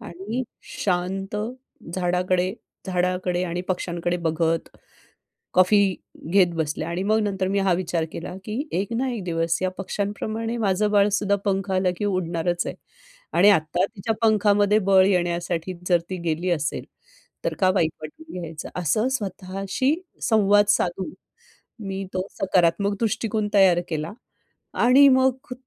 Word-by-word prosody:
आणि 210 +5 -5 0.4
शांत 195 +2 -1 0.6
झाडाकडे 180 0 +1 0.3
झाडाकडे 180 -1 0
आणि 175 0 -3
पक्षांकडे 175 -1 -1
बघत 165 -1 0 0.9
कॉफी 185 +3 +5 0.5
घेत 185 -1 +5
बसले 155 -1 -2
आणि 170 +3 -3
मग 215 +2 +2
नंतर 190 -2 -1
मी 200 +1 0
हा 195 -1 +2
विचार 170 -2 -1
केला, 175 +2 -6
की 225 +8 -3
एक 200 +3 -4
ना 260 +3 0
एक 225 -4 -4
दिवस 165 -1 0
या 185 - +1
पक्ष्यांप्रमाणे 215 +4 -3
माझं 210 -1 +1
बाळ 205 -1 +4
सुद्धा 200 0 +2
पंख 195 -1 -1
आला, 185 -1 +2
की 205 - -3
उडणारच 175 -3 -1
आहे. - - -4 0.6
आणि 195 +4 +5
आता 175 -1 +2
तिच्या 215 +1 -3
पंखामध्ये 210 -1 +4
बळ 190 -1 +7
येण्यासाठी 175 -1 0 0.2
जर 175 -2 +4
ती 185 - -2
गेली 165 +3 0
असेल, 155 -3 -1 0.6
तर - - 0
का 185 -1 +5
वाईट 165 -5 +2
वाटून 320 - -10
घ्यायचं? 165 -2 -7
असं 180 - +1
स्वतःशी 195 - -2 0.3
संवाद 205 -2 +4
साधून 190 - 0 0.7
मी 195 0 -3
तो 185 0 -1
सकारात्मक 195 +2 +2
दृष्टिकोन 220 -1 -1
तयार 190 -3 +5
केला. 155 +2 -3 0.6
आणि 265 +4 +6
मग 260 -1 +2
190 Hz, 140 wpm, -24 LUFS, 175-205 Hz, 0.9 s, बळ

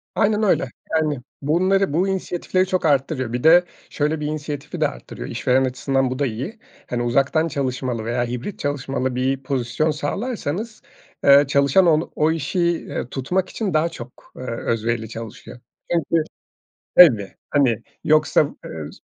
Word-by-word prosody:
Aynen 210 0 +2
öyle. 160 - +2 0.3
Yani, 150 -4 +1 0.2
bunları, 185 +3 +2
bu 180 +4 +2
inisiyatifleri 185 -1 -1
çok 185 -3 -1
arttırıyor. 135 -4 +1
Bir 125 - -2
de 170 +3 +7 0.3
şöyle 150 +1 -1
bir 150 - -3
inisiyatifi 150 -2 -5
de - - +4
arttırıyor. - - -8
İşveren 130 +1 +2
açısından 130 0 0
bu 130 - -4
da 145 - +2
iyi. 135 - -5 0.3
Hani, 120 -1 -1
uzaktan 135 +7 +2
çalışmalı 130 -5 -2
veya 120 +1 0
hibrit 125 - -5
çalışmalı 135 -2 -2
bir 130 +1 -1
pozisyon 135 +3 0
sağlarsanız, 215 - -4 0.4
eee, 140 +1 +7
çalışan 140 +6 +4
ol 160 -1 +3
o 155 +1 +2
işi, 165 +3 -2
iii, 170 -7 -1
tutmak 180 +8 -1
için 205 -6 -3
daha 155 +2 +2
çok, 125 -7 -12
eee, 130 - -8
özverili 115 -1 -2
çalışıyor. 115 +1 -9 0.3
Çünkü 165 -1 +1 0.7
tabii, 115 - +7 0.2
hani, 120 -6 +2 0.2
yoksa, 155 -1 +4 0.3
ııı, 80 -2 -7
145 Hz, 150 wpm, -22 LUFS, 125-165 Hz, 0.7 s, de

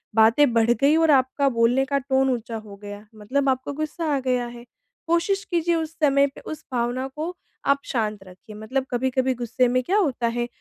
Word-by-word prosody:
बातें 230 +5 +5
बढ़ 230 0 +3
गई 280 +5 +3
और 325 -1 +4
आपका 270 +1 +2
बोलने 235 +3 +3
का 280 +1 0
टोन 265 0 +1
ऊँचा 235 -2 -4
हो 215 -2 -10
गया, 205 +1 -8
मतलब 270 +7 -1
आपको 260 +2 -1
गुस्सा 310 +2 -3
आ - - 0
गया 250 -1 +1
है। 240 0 -11 0.4
कोशिश 340 +4 +1
कीजिए 340 0 +1
उस 320 -1 -2
समय 280 -1 +4
पे - - -11
उस 310 - -7
भावना 245 +2 -1
को 305 +1 -3 0.5
आप 280 - +2
शांत 215 -5 -2
रखिए 185 +3 -14
मतलब 255 +5 -3
कभी-कभी 260 +1 0
गुस्से 245 +1 0
में 255 - +3
क्या 380 +9 +1
होता 270 - +1
है, 240 0 -1
260 Hz, 200 wpm, -23 LUFS, 235-280 Hz, 0.5 s, बातें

